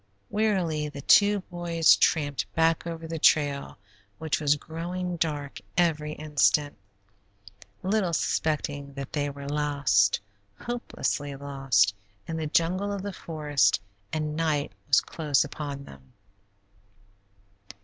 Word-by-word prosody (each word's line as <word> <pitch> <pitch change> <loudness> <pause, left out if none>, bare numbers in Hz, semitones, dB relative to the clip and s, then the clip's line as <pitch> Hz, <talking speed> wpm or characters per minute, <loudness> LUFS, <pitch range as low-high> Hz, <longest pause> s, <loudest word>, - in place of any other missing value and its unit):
Wearily 180 -8 0
the 140 -1 -8
two 205 +3 +5
boys 175 -3 +3
tramped 145 -4 +1
back 165 +1 +2
over 165 -1 -5
the 165 0 -4
trail, 145 -2 +2 0.4
which 160 -1 -1
was 145 -1 +4
growing 175 +4 -4
darker 150 -4 -3 0.2
every 155 -3 +1
instant, 150 -1 +2 1.1
little 195 -2 +1
suspecting 145 -3 -1
that 140 -1 -7
they 145 -1 0
were 140 0 -8
lost, 140 -9 +2 0.4
hopelessly 150 -11 -3
lost, 135 -8 +2 0.3
in 165 - -3
the 160 -1 -2
jungle 180 +6 +1
of 200 -1 -4
the 200 -1 -4
forest, 145 - +1 0.3
and 155 -1 -2
night 155 -3 0 0.2
was - - +5
close 150 -4 +1
upon 145 -1 -6
them. 65 - -15
150 Hz, 120 wpm, -27 LUFS, 145-165 Hz, 1.1 s, two